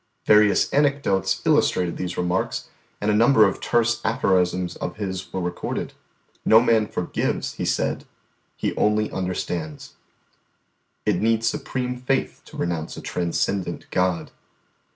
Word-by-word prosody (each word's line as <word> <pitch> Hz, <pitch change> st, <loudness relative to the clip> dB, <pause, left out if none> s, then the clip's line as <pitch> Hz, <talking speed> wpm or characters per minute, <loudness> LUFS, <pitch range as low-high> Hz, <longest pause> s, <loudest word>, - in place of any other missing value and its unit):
Various 105 Hz, -1 st, +4 dB
anecdotes 135 Hz, -10 st, +1 dB
illustrated 90 Hz, -2 st, +2 dB
these 90 Hz, -1 st, -4 dB
remarks, 90 Hz, +1 st, -1 dB, 0.3 s
and 105 Hz, +1 st, +1 dB
a -, -, +2 dB
number 115 Hz, 0 st, +6 dB
of -, -, -4 dB
terse 120 Hz, -1 st, +1 dB
aphorisms 90 Hz, -6 st, +1 dB
of 90 Hz, -, -4 dB
his 95 Hz, -3 st, -4 dB
were 95 Hz, -, -3 dB
recorded. 90 Hz, 0 st, -4 dB, 0.5 s
"No 110 Hz, -, +7 dB
man 115 Hz, -3 st, +3 dB
forgives," 90 Hz, -, -2 dB
he -, -, -4 dB
said; -, -, -1 dB, 0.5 s
"he -, -, -2 dB
only 105 Hz, 0 st, +1 dB
understands." 90 Hz, -4 st, -4 dB, 1.1 s
"It -, -, +2 dB
needs 115 Hz, 0 st, +2 dB
supreme 130 Hz, -3 st, -2 dB
faith 130 Hz, +2 st, -1 dB
to -, -, -12 dB
renounce 85 Hz, -2 st, -3 dB
a -, -, -6 dB
transcendent 90 Hz, +1 st, -2 dB
God." 90 Hz, -2 st, 0 dB
100 Hz, 130 wpm, -23 LUFS, 90-115 Hz, 1.1 s, No